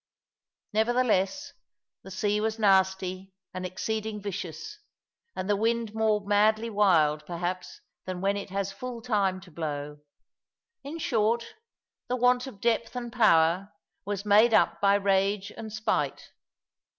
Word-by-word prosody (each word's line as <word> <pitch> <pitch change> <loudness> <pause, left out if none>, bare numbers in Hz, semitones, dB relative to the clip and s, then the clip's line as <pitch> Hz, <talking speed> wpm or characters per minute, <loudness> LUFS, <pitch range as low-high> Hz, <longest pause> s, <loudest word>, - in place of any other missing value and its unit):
Nevertheless 240 +4 +1 0.5
the - - -12
sea 205 +2 0
was 220 0 -1
nasty 190 -2 +1 0.2
and 185 0 -4
exceeding 215 +3 -3
vicious; 195 - -6 0.6
and 185 - -4
the 205 - +2
wind 225 +1 0
more 215 -2 +1
madly 215 +3 +2
wild, 160 -8 +3
perhaps, 180 +1 -4 0.2
than 185 -1 -4
when 195 +2 +1
it 200 0 -5
has 195 0 -2
full 235 +3 -7
time 200 -5 +1
to 185 -2 -15
blow; 150 -2 -5 0.8
in 290 +4 -6
short, 230 -5 0 0.5
the 250 - 0
want 250 +1 +2
of 210 -7 -10
depth 235 +2 0
and 240 -1 -5
power 185 -4 +3 0.3
was 205 0 -4
made 215 +3 +5
up - - +2
by 200 0 +5
rage 195 0 +1
and 220 -1 -7
spite. 215 +1 -2
205 Hz, 135 wpm, -27 LUFS, 190-225 Hz, 0.8 s, made